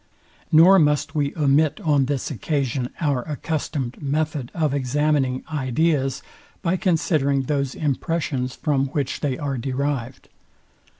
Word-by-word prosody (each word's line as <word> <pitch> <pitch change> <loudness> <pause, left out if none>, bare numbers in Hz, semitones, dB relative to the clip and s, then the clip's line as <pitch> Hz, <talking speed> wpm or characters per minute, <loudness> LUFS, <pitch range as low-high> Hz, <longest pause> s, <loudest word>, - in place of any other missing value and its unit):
Nor 175 +5 +7
must 150 0 +2
we 145 -3 0
omit 150 0 +2
on 145 -4 +2
this 140 +1 -2
occasion 135 - -1
our 145 -6 +1
accustomed 145 -3 -4
method 145 -2 -1
of 155 -4 +1
examining 140 -1 0
ideas 135 0 0 0.4
by 180 0 +1
considering 155 -6 +1
those 140 -1 -1
impressions, 145 -3 -2
from 140 -3 0
which 140 -1 -2
they 135 -4 -1
are 140 -3 -3
derived. 130 -1 -3
145 Hz, 120 wpm, -23 LUFS, 135-155 Hz, 0.4 s, Nor